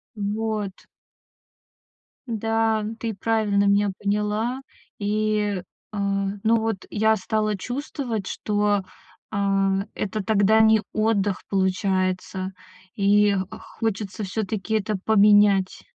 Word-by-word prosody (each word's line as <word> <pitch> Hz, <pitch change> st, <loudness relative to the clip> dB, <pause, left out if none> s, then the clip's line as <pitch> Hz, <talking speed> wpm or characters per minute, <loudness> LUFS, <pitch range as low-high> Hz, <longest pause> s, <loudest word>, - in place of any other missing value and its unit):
Вот. 210 Hz, -1 st, -3 dB, 1.4 s
Да, 225 Hz, -1 st, 0 dB
ты 230 Hz, -1 st, -3 dB
правильно 205 Hz, -1 st, +1 dB
меня 200 Hz, 0 st, +3 dB
поняла. 210 Hz, +5 st, -1 dB, 0.4 s
И, 210 Hz, -1 st, 0 dB, 0.3 s
а, 210 Hz, -, -4 dB, 0.4 s
ну, 225 Hz, +1 st, +4 dB
вот 220 Hz, -4 st, -2 dB
я 220 Hz, +1 st, +3 dB
стала 215 Hz, +1 st, -1 dB
чувствовать, 245 Hz, -3 st, -4 dB
что, 205 Hz, -1 st, 0 dB, 0.5 s
а, 195 Hz, -1 st, +1 dB
это 210 Hz, 0 st, -3 dB
тогда 215 Hz, +1 st, +4 dB
не 220 Hz, -1 st, +5 dB
отдых, 205 Hz, -3 st, +1 dB
получается. 190 Hz, -1 st, 0 dB, 0.4 s
И 205 Hz, 0 st, +4 dB, 0.4 s
хочется 210 Hz, -2 st, -2 dB
всё-таки 210 Hz, +1 st, -2 dB
это 215 Hz, 0 st, 0 dB
поменять. 205 Hz, -2 st, +4 dB
210 Hz, 95 wpm, -24 LUFS, 200-220 Hz, 1.4 s, не